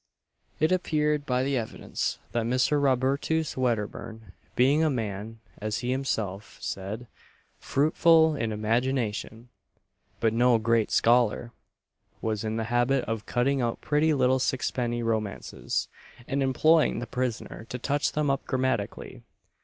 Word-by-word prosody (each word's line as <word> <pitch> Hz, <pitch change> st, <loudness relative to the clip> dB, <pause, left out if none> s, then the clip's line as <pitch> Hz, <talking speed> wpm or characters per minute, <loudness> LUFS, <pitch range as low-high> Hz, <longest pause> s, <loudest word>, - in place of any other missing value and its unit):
It 155 Hz, +3 st, +2 dB
appeared 150 Hz, -5 st, +1 dB
by 125 Hz, 0 st, +1 dB
the 140 Hz, +1 st, 0 dB
evidence, 115 Hz, -2 st, -3 dB
that 115 Hz, -1 st, -1 dB
Mr. 130 Hz, +4 st, +2 dB
Robertus 140 Hz, +4 st, +1 dB
Wedderburn 115 Hz, -3 st, -3 dB, 0.2 s
being 140 Hz, +5 st, +4 dB
a 160 Hz, -, +3 dB
man, 110 Hz, -3 st, -4 dB, 0.2 s
as 110 Hz, +2 st, -2 dB
he 125 Hz, -, 0 dB
himself 110 Hz, -7 st, -3 dB
said, 100 Hz, +5 st, -5 dB, 0.5 s
"fruitful 160 Hz, +2 st, +4 dB
in 115 Hz, -3 st, -2 dB
imagination, 115 Hz, +1 st, -1 dB, 0.7 s
but 115 Hz, -1 st, +2 dB
no 120 Hz, +1 st, +4 dB
great 115 Hz, 0 st, +1 dB
scholar," 120 Hz, 0 st, +2 dB, 0.7 s
was 110 Hz, -1 st, -2 dB
in 110 Hz, 0 st, -2 dB
the 115 Hz, -, -1 dB
habit 120 Hz, +2 st, +2 dB
of 115 Hz, -1 st, -4 dB
cutting 135 Hz, +2 st, +1 dB
out 120 Hz, -1 st, -1 dB
pretty 150 Hz, +2 st, +2 dB
little 130 Hz, -2 st, +3 dB
sixpenny 120 Hz, -2 st, -1 dB
romances, 110 Hz, -3 st, -2 dB, 0.4 s
and 140 Hz, -1 st, -1 dB
employing 155 Hz, +4 st, +3 dB
the 120 Hz, -, -3 dB
prisoner 120 Hz, -2 st, -4 dB
to 125 Hz, -, -4 dB
touch 145 Hz, +4 st, 0 dB
them 150 Hz, -2 st, +1 dB
up 135 Hz, -, -1 dB
grammatically. 130 Hz, -5 st, -2 dB
125 Hz, 130 wpm, -27 LUFS, 115-140 Hz, 0.7 s, being